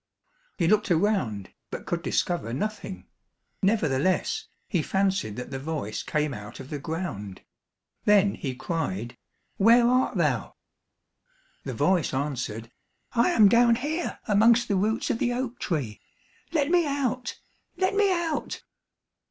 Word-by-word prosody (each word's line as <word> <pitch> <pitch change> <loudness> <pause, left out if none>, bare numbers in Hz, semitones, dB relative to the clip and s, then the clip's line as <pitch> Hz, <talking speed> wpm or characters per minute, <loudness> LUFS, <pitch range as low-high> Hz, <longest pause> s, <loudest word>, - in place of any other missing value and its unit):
He 170 - +2
looked 210 +3 +3
around, 165 - 0 0.2
but - - -6
could 170 -1 -2
discover 175 -9 -1
nothing; 210 +5 -4 0.6
nevertheless, 185 -5 +1 0.2
he 175 - 0
fancied 190 - 0
that 125 +3 -7
the 135 - -4
voice 140 -7 -3
came 150 -2 -1
out 105 +1 -9
of 130 - -10
the 145 - -3
ground. 140 - -5 0.6
Then 205 -1 +5
he 130 -3 -4
cried, 120 - -3 0.4
"Where 230 +4 +6
art 255 +1 +2
thou?" - - 0 1.1
The - - -4
voice 180 -7 +2
answered, 120 -5 -3 0.4
"I 235 +6 +3
am 220 - +6
down 235 +2 +5
here 305 +8 -3
amongst 230 +3 +5
the 200 - +2
roots 215 +4 +1
of 230 - -2
the 245 - +1
oak 245 -1 -3
tree. 135 - -3 0.5
Let 300 -1 +1
me 355 -1 +5
out! 255 -3 -2 0.4
Let 375 +1 +1
me 400 -1 +3
out!" 340 -4 -2
190 Hz, 135 wpm, -26 LUFS, -, 1.1 s, Where